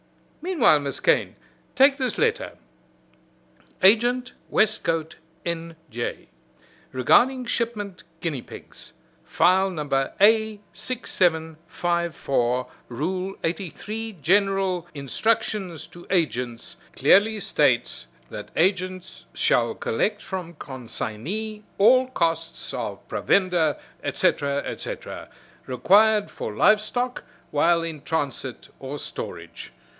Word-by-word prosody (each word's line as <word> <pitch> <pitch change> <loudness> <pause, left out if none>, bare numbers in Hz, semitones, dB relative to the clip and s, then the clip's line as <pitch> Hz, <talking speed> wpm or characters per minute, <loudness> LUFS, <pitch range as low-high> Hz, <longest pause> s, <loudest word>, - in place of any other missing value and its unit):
Meanwhile, 315 - +5
Miss 140 -1 -3
Kane, - - +2 0.4
take 275 +1 +5
this 255 -3 -1
letter: 465 +2 0 1.3
Agent, 240 +5 +4 0.2
Westcote, 165 -7 +1 0.3
N. 165 -1 -3 0.2
J. 120 +1 -5 0.6
Regarding 250 - +3
shipment 215 -5 -3 0.2
guinea 155 -7 -2
pigs, - - -12 0.3
File 190 +2 +3
No. 155 -5 -4
A6754. 170 - 0 0.2
Rule 185 +9 -3
83, 210 +6 -4
General 195 -1 +2
Instruction 200 - -1
to 175 - -13
Agents, 125 -10 -1 0.2
clearly 215 +3 +4
states 200 - +1 0.2
that - - -7
agents 185 +1 -1
shall - - +2
collect - - -1
from 180 -3 -6
consignee 145 - -5
all 255 +6 +5
costs 165 -7 -2
of - - -5
provender, 180 -6 +2 0.3
etc., 140 0 +1
etc., - - -6 0.4
required 205 - +4
for 105 - -6
live 210 - +5
stock 245 +3 -3 0.3
while 165 +3 +3
in 160 -3 -5
transit 140 -5 -3
or 135 +2 -6
storage. - - -7
180 Hz, 90 wpm, -24 LUFS, 155-215 Hz, 1.3 s, Meanwhile